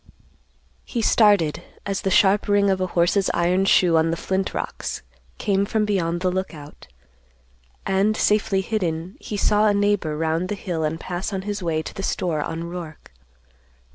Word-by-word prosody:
He 235 -3 -3
started 205 -9 +3 0.2
as 195 -1 -2
the 195 - -1
sharp 195 +2 +3
ring 200 -1 +3
of 190 -1 -1
a 185 - 0
horse's 180 +3 +2
iron 180 +3 +2
shoe 175 -3 +4
on 160 +1 +2
the 165 - -1
flint 190 +2 -2
rocks - - -5 0.3
came 195 -1 +1
from 215 +1 0
beyond 175 -4 -1
the 185 -1 +1
Lookout, 165 -6 -6 1.0
and, 195 +3 +1
safely 205 -2 +2
hidden, 180 -3 -3
he 210 - -5
saw 210 +1 +3
a 205 - +3
neighbor 200 -7 +1
round 165 +3 -1
the 210 - -1
hill 175 -5 -3
and 155 +1 -2
pass 180 +4 -4
on 190 -1 -3
his 205 0 -4
way 160 -2 -1
to - - -8
the - - -6
store 170 -5 -1
on 165 +2 -4
Roark. 170 - -8
190 Hz, 170 wpm, -23 LUFS, 165-200 Hz, 1.0 s, shoe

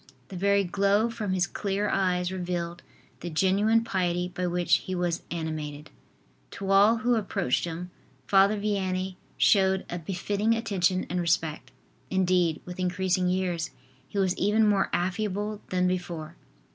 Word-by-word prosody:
The 190 - -8
very 200 +2 +2
glow 200 +5 +2
from 215 -4 -3
his 180 -2 +2
clear 200 +2 -2
eyes 180 -2 +1
revealed 175 -2 -3 0.4
the 175 - -5
genuine 200 +7 +3
piety 180 -5 0
by 180 0 -3
which 175 0 +2
he 185 - -5
was 175 -1 -1
animated. 155 -3 -5 0.7
To 195 -1 -3
all 205 +4 +6
who 240 +2 +1
approached 195 - 0
him, 175 +2 -6 0.3
Father 195 +6 +4
Vianney 190 -2 -1 0.2
showed 190 -2 +3
a 175 - -3
befitting 200 +6 0
attention 190 -5 0
and 180 - -1
respect. 160 -2 -1 0.4
Indeed, 180 -3 +2
with 180 +1 -8
increasing 185 0 +1
years, 180 -3 -1 0.4
he - - -7
was 190 -2 +2
even 210 +3 +3
more 200 -2 +2
affable 205 +3 -2
than 180 0 +1
before. 170 -3 -4
185 Hz, 145 wpm, -27 LUFS, 175-200 Hz, 0.7 s, all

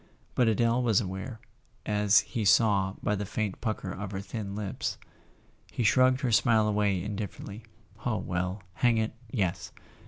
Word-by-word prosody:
But 125 - +3
Adele 115 +3 +2
was 115 -5 +3
aware, 100 +3 -5 0.5
as 105 -1 +4
he 115 - -4
saw 100 -2 +3
by 105 - +1
the 105 0 -2
faint 105 0 -3
pucker 110 -5 -3
of 100 +1 -6
her 95 - -3
thin 100 0 -5
lips. 105 -2 -3 0.7
He 120 - -2
shrugged 130 +4 +4
her 130 -4 0
smile 110 -1 +4
away 100 -4 +1
indifferently. 105 +1 -6 0.4
"Oh, 110 -3 0
well—hang 95 +6 -1
it, 110 0 0 0.2
yes! 100 -7 -2
105 Hz, 150 wpm, -29 LUFS, 100-115 Hz, 0.7 s, as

